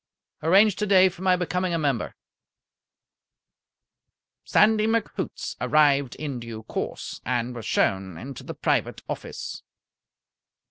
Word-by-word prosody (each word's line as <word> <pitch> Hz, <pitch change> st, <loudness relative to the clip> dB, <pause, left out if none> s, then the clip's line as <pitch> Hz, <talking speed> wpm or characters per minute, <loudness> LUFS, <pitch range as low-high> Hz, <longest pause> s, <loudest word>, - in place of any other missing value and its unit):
"Arrange 195 Hz, +5 st, +5 dB
today 195 Hz, -3 st, +4 dB
for 180 Hz, 0 st, -13 dB
my 185 Hz, -1 st, +4 dB
becoming 180 Hz, 0 st, -1 dB
a -, -, +1 dB
member." 140 Hz, -7 st, -1 dB, 2.3 s
Sandy 215 Hz, 0 st, +4 dB
McHoots 230 Hz, 0 st, -2 dB
arrived 140 Hz, -4 st, +3 dB
in 140 Hz, -3 st, -4 dB
due 115 Hz, -2 st, -8 dB
course, -, -, -5 dB
and 125 Hz, 0 st, -1 dB
was 115 Hz, -4 st, -7 dB
shown 95 Hz, -3 st, 0 dB
into 130 Hz, +6 st, -8 dB
the -, -, -7 dB
private -, -, -1 dB
office. -, -, -6 dB
155 Hz, 110 wpm, -25 LUFS, 120-185 Hz, 2.3 s, Arrange